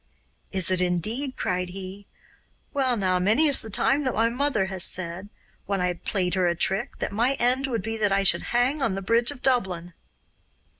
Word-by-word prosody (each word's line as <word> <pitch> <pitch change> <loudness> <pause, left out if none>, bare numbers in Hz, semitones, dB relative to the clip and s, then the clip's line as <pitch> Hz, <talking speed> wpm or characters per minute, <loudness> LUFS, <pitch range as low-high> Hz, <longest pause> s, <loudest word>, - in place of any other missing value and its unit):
'Is 190 -2 +1
it 185 -1 +1
indeed?' 215 - -1
cried 180 0 -1
he. 195 +2 -8 0.7
'Well, 260 -4 +1
now, 185 -2 +1
many 215 +12 +3
is 285 -3 +4
the 220 - -7
time 275 +7 +2
that 260 - -1
my 225 +1 +3
mother 245 -4 0
has 190 -2 -2
said, 185 +2 -2 0.4
when 200 0 -1
I 180 0 0
played 180 +1 -2
her 185 -1 +2
a 170 - +1
trick, 195 +9 -1
that - - -3
my 235 +6 +1
end 255 +2 +1
would 230 -7 -2
be 225 +1 -3
that 210 -2 +1
I 195 0 +2
should 195 - +2
hang 250 +5 +1
on 195 - 0
the 195 - -4
bridge 230 +4 +2
of 285 -3 -7
Dublin. 185 -9 0
205 Hz, 200 wpm, -25 LUFS, 185-245 Hz, 0.7 s, is